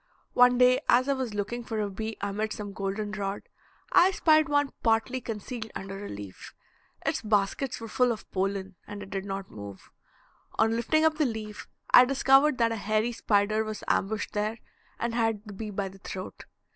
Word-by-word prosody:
One 245 Hz, 0 st, +6 dB
day 250 Hz, +1 st, +5 dB
as 255 Hz, +2 st, +5 dB
I 280 Hz, -, +3 dB
was 255 Hz, -5 st, -3 dB
looking 210 Hz, +4 st, -3 dB
for 225 Hz, -2 st, -4 dB
a 210 Hz, -, 0 dB
bee 220 Hz, +3 st, -5 dB
amid 210 Hz, +2 st, -2 dB
some 205 Hz, -1 st, -6 dB
golden 200 Hz, +1 st, -3 dB
rod, 200 Hz, -1 st, -3 dB, 0.5 s
I 365 Hz, -, +6 dB
spied 310 Hz, -5 st, +3 dB
one 290 Hz, -1 st, +2 dB
partly 230 Hz, +3 st, +1 dB
concealed 225 Hz, +1 st, -5 dB
under 195 Hz, +1 st, -6 dB
a -, -, -6 dB
leaf. 100 Hz, -2 st, -9 dB, 0.5 s
Its -, -, 0 dB
baskets 210 Hz, +4 st, 0 dB
were 225 Hz, -, -7 dB
full 250 Hz, +2 st, +2 dB
of 220 Hz, -, -6 dB
pollen, 195 Hz, 0 st, -2 dB
and 205 Hz, 0 st, -7 dB
it 195 Hz, -, -12 dB
did 195 Hz, -1 st, -3 dB
not 195 Hz, -1 st, -5 dB
move. 100 Hz, -2 st, -10 dB, 0.6 s
On 225 Hz, +1 st, +2 dB
lifting 310 Hz, +7 st, +2 dB
up 315 Hz, 0 st, +2 dB
the 305 Hz, -, +4 dB
leaf 220 Hz, -3 st, -5 dB, 0.2 s
I 250 Hz, -, +9 dB
discovered 270 Hz, +1 st, +4 dB
that 230 Hz, -2 st, +2 dB
a 225 Hz, -, -2 dB
hairy 215 Hz, +3 st, 0 dB
spider 215 Hz, -1 st, +1 dB
was 215 Hz, -1 st, -6 dB
ambushed 215 Hz, +2 st, 0 dB
there 215 Hz, +2 st, -1 dB, 0.4 s
and 235 Hz, 0 st, -2 dB
had 225 Hz, -3 st, 0 dB
the 210 Hz, -, -9 dB
bee 215 Hz, +2 st, -6 dB
by 200 Hz, -1 st, -2 dB
the 195 Hz, +1 st, -12 dB
throat. 185 Hz, 0 st, -7 dB
215 Hz, 190 wpm, -28 LUFS, 200-245 Hz, 0.6 s, I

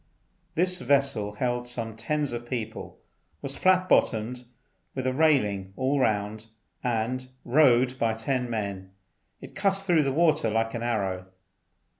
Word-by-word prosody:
This 180 Hz, +2 st, +1 dB
vessel 135 Hz, -6 st, +1 dB
held 120 Hz, +2 st, -2 dB
some 115 Hz, -2 st, -3 dB
tens 145 Hz, +6 st, -1 dB
of 120 Hz, 0 st, -6 dB
people, 110 Hz, -3 st, -5 dB, 0.5 s
was 140 Hz, 0 st, -4 dB
flat 185 Hz, 0 st, +3 dB
bottomed 125 Hz, -3 st, +1 dB, 0.5 s
with 130 Hz, -1 st, -3 dB
a 130 Hz, -, +1 dB
railing 105 Hz, -11 st, +2 dB
all 135 Hz, +2 st, +1 dB
round, 110 Hz, -2 st, 0 dB, 0.4 s
and, 125 Hz, +2 st, -1 dB, 0.2 s
rowed 130 Hz, -1 st, +4 dB
by 115 Hz, -1 st, +1 dB
ten 125 Hz, +2 st, -1 dB
men, 100 Hz, -4 st, -4 dB, 0.5 s
it -, -, -11 dB
cut 195 Hz, 0 st, +1 dB
through 180 Hz, -5 st, +2 dB
the 140 Hz, -2 st, 0 dB
water 155 Hz, -5 st, +3 dB
like 115 Hz, +1 st, 0 dB
an 115 Hz, -, -3 dB
arrow. 95 Hz, -6 st, -2 dB
120 Hz, 140 wpm, -27 LUFS, 110-140 Hz, 0.5 s, rowed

